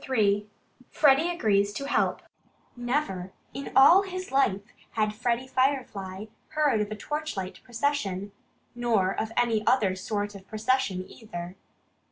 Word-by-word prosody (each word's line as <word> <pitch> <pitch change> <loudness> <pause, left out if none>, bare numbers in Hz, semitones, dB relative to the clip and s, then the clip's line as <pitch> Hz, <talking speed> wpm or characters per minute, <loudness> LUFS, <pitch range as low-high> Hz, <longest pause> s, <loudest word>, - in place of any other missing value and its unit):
III 210 -4 +2 0.4
FREDDIE 295 +3 +4
AGREES 205 - +2
TO 275 - -4
HELP 280 - 0 0.5
Never 240 -8 -2 0.2
in 275 - -6
all 330 +8 +8
his 370 -3 -6
life 235 -8 +2 0.3
had 215 -1 +1
Freddie 240 +2 -1
Firefly 250 -8 -1 0.2
heard 295 -8 +2
of 210 - -2
a 215 - -4
torchlight 260 -8 -4
procession 230 -7 -2 0.4
nor 230 -6 +1
of 220 +2 -3
any 230 -3 +2
other 205 -8 +3
sort 205 +2 -3
of 195 -1 -12
procession, 215 -4 0
either. 180 -5 -8
220 Hz, 130 wpm, -27 LUFS, 200-270 Hz, 0.5 s, all